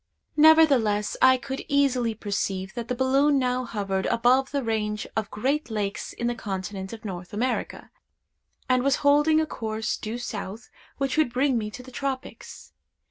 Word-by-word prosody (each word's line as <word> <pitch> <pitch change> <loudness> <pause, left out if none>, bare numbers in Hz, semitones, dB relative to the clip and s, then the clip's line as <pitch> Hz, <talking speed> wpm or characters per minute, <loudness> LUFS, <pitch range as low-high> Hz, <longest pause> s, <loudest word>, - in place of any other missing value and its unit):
Nevertheless, 280 -10 +5
I 260 0 +7
could 265 +2 -6
easily 260 -5 +2
perceive 195 -3 -3
that 235 -1 -5
the 250 - -2
balloon 275 +3 +3
now 255 -1 0
hovered 195 -4 -2
above 250 +3 +3
the 280 -2 -2
range 210 -2 -2
of 220 -2 -2
great 270 +6 -1
lakes 210 -2 -3
in 235 - -5
the 240 - +1
continent 190 -3 -5
of 225 0 -10
North 180 -2 -7
America, 245 +4 -3 0.8
and 255 -1 +3
was 275 +1 +2
holding 295 +2 +5
a 315 - +1
course, 220 -5 -3
due 220 +2 -5
south, 220 -2 -6 0.3
which 275 0 -1
would 310 -6 +3
bring 260 +2 +1
me 215 -2 -1
to 250 +4 -10
the 255 - -12
tropics. 265 0 -6
240 Hz, 165 wpm, -25 LUFS, 210-270 Hz, 0.8 s, I